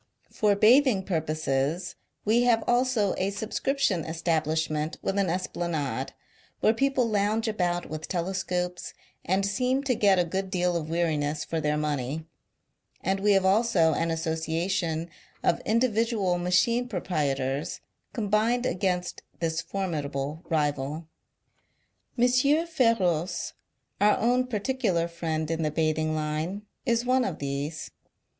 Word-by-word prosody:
For 210 -2 +2
bathing 230 0 +5
purposes, 155 -1 -1 0.3
we 225 +3 +4
have 240 -2 +3
also 240 -5 +2
a 190 +1 +1
subscription 220 - -1
establishment 160 -1 -1
with 195 +1 0
an 195 -3 +1
esplanade, 170 -4 -2 0.5
where 220 - +4
people 270 0 +1
lounge 215 +1 +1
about 175 -5 -1
with 155 0 -6
telescopes, 180 0 -2 0.3
and 190 +2 +1
seem 250 +7 0
to 270 -2 +1
get 200 -4 +4
a 180 - +3
good 190 +3 -3
deal 180 -2 0
of 160 -2 -2
weariness 155 -3 0
for 165 -1 -2
their 150 0 +1
money; 150 0 -2 0.8
and 195 +1 0
we 205 +1 +4
have 195 -1 +3
also 190 -5 +3
an 165 - 0
association 165 +1 -1 0.4
of - - +2
individual 225 -5 +1
machine 190 +8 +2
proprietors 145 - -2 0.3
combined 225 +2 +1
against 180 -3 -1 0.2
this 165 -1 -1
formidable 155 -6 -3
rival. 150 0 -1 1.1
M. 240 - +2
F£roce, 250 - +2 0.5
our 210 0 +5
own 250 +3 +2
particular 215 -7 0
friend 160 -2 -3
in 165 0 -1
the 155 - +1
bathing 155 0 0
line, 155 +6 -2 0.2
is 235 0 +2
one 255 +1 +3
of 185 -9 -3
these. 140 +3 -4
180 Hz, 125 wpm, -27 LUFS, 160-220 Hz, 1.1 s, bathing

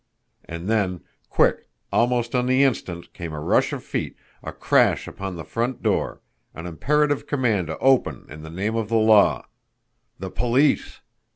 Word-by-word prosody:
And 85 +2 -7
then, 100 -5 0 0.3
quick, - - +1 0.2
almost 120 0 +1
on 125 -1 +1
the 130 +2 +4
instant, 85 -10 -2
came 85 -3 -7
a 75 - -5
rush 75 - +2
of - - -5
feet, - - -4 0.3
a - - -6
crash - - +2
upon 95 -2 -6
the 85 - -7
front 120 +6 -3
door - - -1 0.3
an 80 - -8
imperative 145 - 0
command 115 - 0
to 80 - -5
open 135 -1 +2
in 75 +2 -10
the 80 - -9
name 100 +7 -2
of 110 -2 -2
the 115 - 0
law. 110 -2 +4 0.7
THE 95 -1 -6
POLICE! 130 +5 +1
110 Hz, 165 wpm, -23 LUFS, 85-125 Hz, 0.7 s, the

